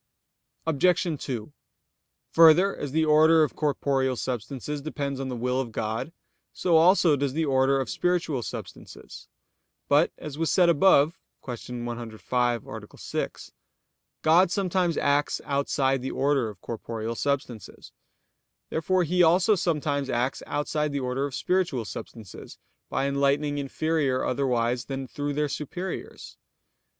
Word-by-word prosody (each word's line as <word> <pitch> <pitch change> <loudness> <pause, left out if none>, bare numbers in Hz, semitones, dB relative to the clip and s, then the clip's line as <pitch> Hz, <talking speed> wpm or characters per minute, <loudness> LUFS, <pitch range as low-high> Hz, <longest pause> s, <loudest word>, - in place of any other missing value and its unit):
Obj. 165 +3 +2 0.2
2: 125 +1 -5 0.8
Further, 165 +4 +6
as 145 - -5
the 160 +2 +2
order 155 +1 +5
of 150 - -2
corporeal 135 -3 0
substances 130 +4 -4
depends 140 -2 -4
on 135 -1 -3
the 125 - -3
will 125 +2 0
of 120 -3 -6
God, 110 +7 -3 0.4
so 175 -2 +1
also 170 -1 +5
does 140 -1 -1
the 160 +2 0
order 135 0 +2
of 135 - -2
spiritual 175 -6 0
substances. - - -9 0.6
But, 145 +4 +4
as 150 0 -8
was 165 - +1
said 180 -2 +4
above 170 -1 +4 0.3
(Q. 120 -1 -6
105, 120 0 -2
A. - - -10
6), - - -5 0.7
God 170 +4 +5
sometimes 180 -3 0
acts 145 +1 +1
outside 135 -1 0
the 130 - -3
order 135 -3 +1
of 100 -4 -12
corporeal 115 0 -5
substances. 130 -5 -4 0.8
Therefore 180 +3 +1
He 180 +2 +1
also 175 +5 +5
sometimes 150 -6 -1
acts 125 +1 -1
outside 150 +1 -1
the 140 - -1
order 130 +2 -1
of 135 - -7
spiritual 175 -11 0
substances, 105 -2 -9 0.3
by 135 - 0
enlightening 140 +1 +1
inferior 140 -1 0
otherwise 125 -2 0
than 135 -1 -5
through 145 +1 -4
their 150 +1 0
superiors. 165 +6 -6
140 Hz, 135 wpm, -26 LUFS, 130-160 Hz, 0.8 s, Further